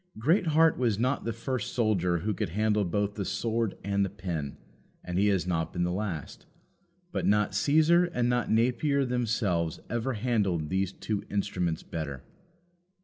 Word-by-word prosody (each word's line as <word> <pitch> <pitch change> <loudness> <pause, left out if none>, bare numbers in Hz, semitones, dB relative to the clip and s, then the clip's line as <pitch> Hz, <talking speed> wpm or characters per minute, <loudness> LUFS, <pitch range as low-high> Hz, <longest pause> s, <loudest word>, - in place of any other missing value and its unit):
Greatheart 160 - +3
was 115 -5 +2
not 130 +5 0
the 115 - 0
first 115 0 -3
soldier 95 -7 +2
who 110 - +1
could 105 -4 -2
handle 105 +3 +1
both 100 +3 -1
the 105 - -3
sword 110 +2 -1
and 100 0 +1
the 95 - -1
pen, 85 -7 -4 0.5
and 90 +1 -2
he 105 - +4
has 95 -4 +2
not 80 -3 -1
been 90 - -1
the 90 - 0
last. 90 -5 -4 0.6
But - - -1
not 105 -1 +2
Caesar 155 - +4
and 125 -9 -1
not 120 -1 +1
Napier 130 +5 +2
themselves 110 -9 0
ever 120 +3 -1
handled 100 -9 0
those 95 0 0
two 105 0 -3
instruments 90 -5 -1
better. 70 -5 -5
105 Hz, 160 wpm, -28 LUFS, 90-120 Hz, 0.6 s, he